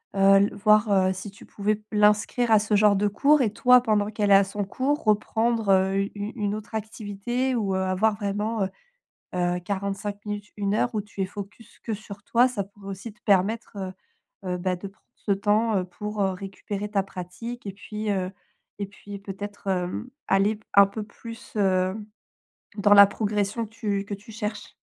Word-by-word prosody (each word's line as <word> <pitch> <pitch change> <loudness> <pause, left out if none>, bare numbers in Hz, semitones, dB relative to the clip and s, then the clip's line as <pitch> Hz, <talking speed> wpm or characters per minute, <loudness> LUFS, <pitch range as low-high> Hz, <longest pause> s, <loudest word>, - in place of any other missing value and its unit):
heu, - - -2 0.2
l 200 +1 +4
voir, 215 +1 +4
heu, 190 -1 +3
si 190 +2 -7
tu 200 - -15
pouvais 210 +1 -1
l'inscrire 210 +3 +3
à 215 - +7
ce 210 0 0
genre 205 0 +5
de 205 +1 +2
cours 280 +8 +4
et 225 -5 +2
toi, 250 +2 +6
pendant 210 -3 +1
qu'elle 210 -1 0
est - - +9
à 195 - +7
son 200 +1 -3
cours, 270 +8 -1
reprendre, 220 +1 +1
heu, 190 0 +3
u 195 +1 0 0.2
une 205 -2 -1
autre 215 +1 -8
activité 220 +4 -2
ou, 205 -5 0
heu, - - +1
avoir 190 +3 +2
vraiment, 205 +1 -1
heu, 190 - -1 0.7
heu, 180 0 +1
45 200 +2 -3
minutes, 205 0 -5
1 200 0 0
heure 240 +2 0
où 215 - +1
tu 205 -1 -10
es - - 0
focus 205 +3 -10
que 225 - -2
sur 200 -1 -10
toi, 240 +3 +4
ça 235 -5 -2
pourrait 200 0 -14
aussi 195 +4 -6
te 210 - -30
permettre, 205 +3 +2
heu, 190 -2 -4 0.6
heu, 180 - 0
bah, 180 0 -1
de 180 - -7
prendre 195 - -25
ce 200 - -1
temps, 210 +2 +2
heu, 185 - -1
pour, 210 +3 -4
heu, 195 - +2
récupérer 195 +2 -5
ta 200 -2 +1
pratique 195 +6 -8
et 200 - -4
puis, 210 +1 -6
heu 185 -2 -1 0.5
et 200 - -2
puis 200 0 -10
peut-être, 205 +1 -8
hem, 180 +5 -2 0.2
aller 200 +3 +3
p 210 - -21
un 200 0 +8
peu 200 +2 -6
plus, 230 +2 -11
heu, 185 -2 +2 0.8
dans 205 0 +5
la 200 0 +11
progression 210 +2 -1
que - - -20
tu 205 -3 -2
que 205 - -4
tu 205 +3 -13
cherches. 210 -1 -5
205 Hz, 200 wpm, -25 LUFS, 195-215 Hz, 0.8 s, la